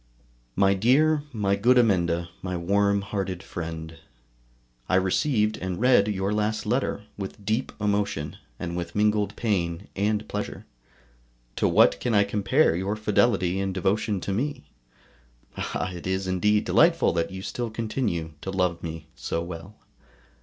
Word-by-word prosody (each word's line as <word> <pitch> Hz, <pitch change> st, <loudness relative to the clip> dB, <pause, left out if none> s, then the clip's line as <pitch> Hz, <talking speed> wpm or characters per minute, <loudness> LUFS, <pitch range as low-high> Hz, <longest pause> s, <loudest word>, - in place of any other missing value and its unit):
MY 100 Hz, 0 st, +4 dB
DEAR, 145 Hz, +9 st, +3 dB
MY 100 Hz, -5 st, +1 dB
GOOD 125 Hz, +5 st, +4 dB
AMENDA, 85 Hz, -7 st, +2 dB
MY 90 Hz, -1 st, -3 dB
WARM 100 Hz, +3 st, +2 dB
HEARTED 95 Hz, -3 st, -3 dB
FRIEND, 80 Hz, -1 st, -6 dB, 0.9 s
I -, -, +3 dB
received 105 Hz, +3 st, +2 dB
and 90 Hz, -1 st, -4 dB
read 125 Hz, -4 st, +5 dB
your 100 Hz, -1 st, -1 dB
last 105 Hz, +1 st, -1 dB
letter 115 Hz, -2 st, -1 dB, 0.2 s
with 100 Hz, +1 st, -7 dB
deep 110 Hz, +5 st, 0 dB
emotion, 100 Hz, -7 st, -1 dB, 0.2 s
and 85 Hz, -1 st, -4 dB
with 85 Hz, -1 st, -5 dB
mingled 105 Hz, 0 st, +1 dB
pain 90 Hz, -5 st, -1 dB
and 105 Hz, +2 st, 0 dB
pleasure. 105 Hz, 0 st, -5 dB, 0.9 s
To -, -, +2 dB
what 70 Hz, -, +5 dB
can 120 Hz, -3 st, 0 dB
I 100 Hz, -, +6 dB
compare 105 Hz, -, +2 dB
your 95 Hz, +4 st, -1 dB
fidelity 100 Hz, -3 st, +2 dB
and 95 Hz, -1 st, -2 dB
devotion 100 Hz, +2 st, 0 dB
to 100 Hz, -, -2 dB
me? 140 Hz, -, -2 dB, 0.9 s
Ah! 85 Hz, +3 st, -3 dB
it 90 Hz, 0 st, -7 dB
is 95 Hz, +1 st, -1 dB
indeed 105 Hz, +3 st, +2 dB
delightful 165 Hz, -, +4 dB
that 85 Hz, -1 st, 0 dB
you 95 Hz, 0 st, -7 dB
still 120 Hz, +2 st, -3 dB
continue 110 Hz, -, -2 dB
to -, -, -5 dB
love 90 Hz, -3 st, 0 dB
me 80 Hz, -2 st, -6 dB
so 85 Hz, 0 st, -3 dB
well. 85 Hz, +4 st, -8 dB
100 Hz, 145 wpm, -26 LUFS, 90-105 Hz, 0.9 s, I